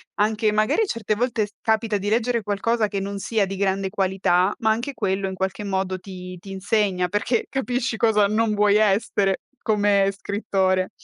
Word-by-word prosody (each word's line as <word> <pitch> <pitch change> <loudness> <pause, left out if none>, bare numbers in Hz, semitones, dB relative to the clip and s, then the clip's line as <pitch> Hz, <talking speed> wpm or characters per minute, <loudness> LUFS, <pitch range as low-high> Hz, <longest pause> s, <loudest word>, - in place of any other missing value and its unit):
Anche 215 +1 +1
magari 215 - +2
certe 225 - -1
volte 235 -1 0
s - - -21
capita 220 -1 +1
di 200 +1 -3
leggere 235 +2 +1
qualcosa 215 +2 0
che 200 - -2
non 200 +1 -4
sia 215 0 0
di 195 +1 -5
grande 195 0 0
qualità, 190 -1 +1
ma 220 -3 +1
anche 235 +6 -2
quello 195 -4 -1
in - - -5
qualche 190 +2 -3
modo 190 -1 -1
ti 180 -1 -9
ti 195 +2 -11
insegna, 195 -1 0
perché 205 +5 0
capisci 250 -2 -1
cosa 215 -3 +3
non 215 +1 +1
vuoi 205 0 +3
essere 200 -2 +1 0.2
come 205 -2 +2
scrittore. 190 -3 0
205 Hz, 175 wpm, -23 LUFS, 195-220 Hz, 0.2 s, cosa